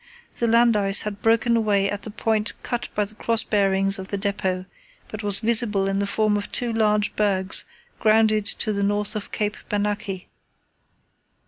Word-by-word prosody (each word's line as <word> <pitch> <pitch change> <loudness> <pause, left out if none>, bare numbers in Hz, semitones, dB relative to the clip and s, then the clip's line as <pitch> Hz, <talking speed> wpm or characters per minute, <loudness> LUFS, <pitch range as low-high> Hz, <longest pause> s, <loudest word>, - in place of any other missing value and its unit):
The 235 - +1
land 230 0 +4
ice 195 -1 +3
had 205 -1 -6
broken 230 +1 +2
away 205 -3 +1
at 205 0 -4
the - - -7
point 220 0 -1
cut 240 -1 -3
by 210 - +1
the 205 - -8
cross 230 +1 +1
bearings 195 -1 +1
of 190 - -7
the 200 - -4
depot, 195 -2 -2 0.4
but 215 - -7
was 205 -1 +2
visible 220 -4 +2
in 195 0 -1
the 200 - -1
form 210 +1 +1
of 205 - -6
two 240 -2 -1
large 210 -1 +1
bergs 190 -3 +1 0.3
grounded 215 -1 +3
to 215 +1 +1
the 200 - -2
north 205 +2 0
of 210 - -5
Cape 210 0 -2
Bernacchi. 205 -2 -3
210 Hz, 180 wpm, -23 LUFS, 200-220 Hz, 0.4 s, land